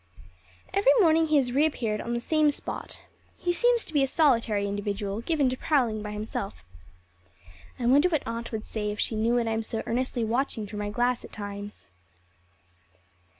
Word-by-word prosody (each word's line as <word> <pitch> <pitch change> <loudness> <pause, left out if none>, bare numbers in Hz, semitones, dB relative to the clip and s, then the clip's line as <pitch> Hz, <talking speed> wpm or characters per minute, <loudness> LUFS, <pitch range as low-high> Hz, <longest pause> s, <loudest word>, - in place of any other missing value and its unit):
Every 405 +5 +5
morning 325 -4 +4
he 310 - +2
has 260 -4 +3
reappeared 250 -6 +1
on 235 0 -3
the - - 0
same 310 +3 +3
spot. 290 - -6 0.3
He 350 - 0
seems 480 +4 +3
to - - -11
be 290 - +3
a 270 - +3
solitary 230 -9 +2
individual, 205 +1 -3
given 295 0 +1
to 255 - -1
prowling 245 -9 +1
by 210 - -5
himself. 210 - -5 1.1
I 245 - -3
wonder 285 +8 +5
what 310 -4 0
Aunt 230 +1 -4
would 220 -2 -4
say 210 -2 -3
if 210 - -5
she - - 0
knew 225 +2 +1
what 235 -1 +1
I - - 0
am 220 0 0
so 225 0 -4
earnestly 245 0 -1
watching 230 -1 -1
through 210 +1 -7
my 205 0 -2
glass 245 +3 0
at - - -11
times. 205 0 -7
235 Hz, 185 wpm, -27 LUFS, 215-290 Hz, 1.1 s, Every